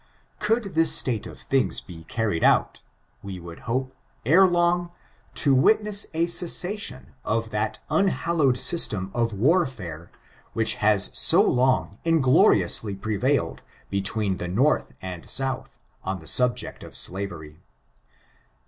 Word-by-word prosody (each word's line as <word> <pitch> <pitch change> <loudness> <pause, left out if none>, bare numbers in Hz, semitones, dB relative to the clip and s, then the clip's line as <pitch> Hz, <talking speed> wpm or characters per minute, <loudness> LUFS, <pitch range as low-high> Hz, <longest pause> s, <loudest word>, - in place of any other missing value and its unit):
Gould 225 +2 +1
this 165 +1 +3
state 115 -5 -1
of - - -11
things 135 -2 0
be 80 -2 -12
carried 105 -7 -2
out, - - +2 0.4
we 95 -2 -7
would 85 -1 -10
hope, 130 +2 -2 0.3
ere 185 +7 +6
long, 175 0 +1 0.5
to 140 -4 +2
witness 210 +8 +2
a 165 +1 +1
cessation 180 +4 -4
of 115 +1 -2
that 110 0 -2
unhallowed 170 -8 +1
system 100 - +1
of 115 -1 0
warfare 105 - -1 0.4
which 115 0 +1
has 105 -1 +3
so - - +5
long 130 +1 +1
ingloriously 145 - +3
prevailed 110 - -1 0.3
be 100 0 0
tween 100 -1 -1
the 90 - -4
North 125 +12 +1
and 90 -3 -7
South, 135 0 -3 0.3
on 95 +1 -3
the 80 - -14
subject 125 +7 0
of - - -11
slavery. 85 -5 -3
120 Hz, 130 wpm, -24 LUFS, 95-165 Hz, 0.5 s, ere